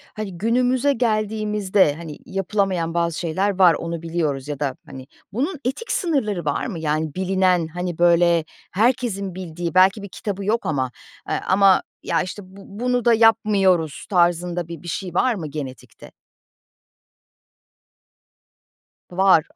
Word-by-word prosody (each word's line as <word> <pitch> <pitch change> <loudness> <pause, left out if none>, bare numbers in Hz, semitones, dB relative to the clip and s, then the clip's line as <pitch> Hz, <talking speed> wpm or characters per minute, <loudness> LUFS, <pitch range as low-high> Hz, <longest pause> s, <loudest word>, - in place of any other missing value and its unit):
hani, 200 -5 -5
günümüze 250 +6 +2
geldiğimizde, 210 - +1
hani, 160 -2 -8
yapılamayan 190 -3 -1
bazı 170 -2 0
şeyler 190 +4 -1
var, 180 -3 +7
onu 170 -1 -4
biliyoruz 155 -5 -2
ya 145 -2 -5
da, 140 -3 -1
hani, 130 0 -10 0.3
bunun 290 - -2
etik 280 - -3
sınırları 225 - -1
var 145 - -1
mı? 195 -10 -5
Yani, 155 -1 -2
bilinen, 185 -2 +1
hani, 175 +1 -5
böyle 170 -1 +4 0.3
herkesin 205 -3 0
bildiği 175 -2 -5
belki 190 +3 +4
bir 200 - -7
kitabı 200 +1 -5
yok 225 +3 0
ama, 130 -4 -1 0.4
eee, - - 0
ama 195 0 +5 0.2
ya, - - +1
işte, 185 +3 -6
bu 190 +2 -15 0.2
bunu 250 -1 +1
da 235 - +6
yapmıyoruz 205 -8 +3
tarzında 175 -2 +1
bir 170 -3 -8
bir 175 - -10
şey 180 +1 -4
var 235 +6 +2
mı 160 -5 -5
genetikte? 140 -3 -8 3.0
Var. 185 -3 +4
185 Hz, 140 wpm, -22 LUFS, 165-210 Hz, 3.0 s, var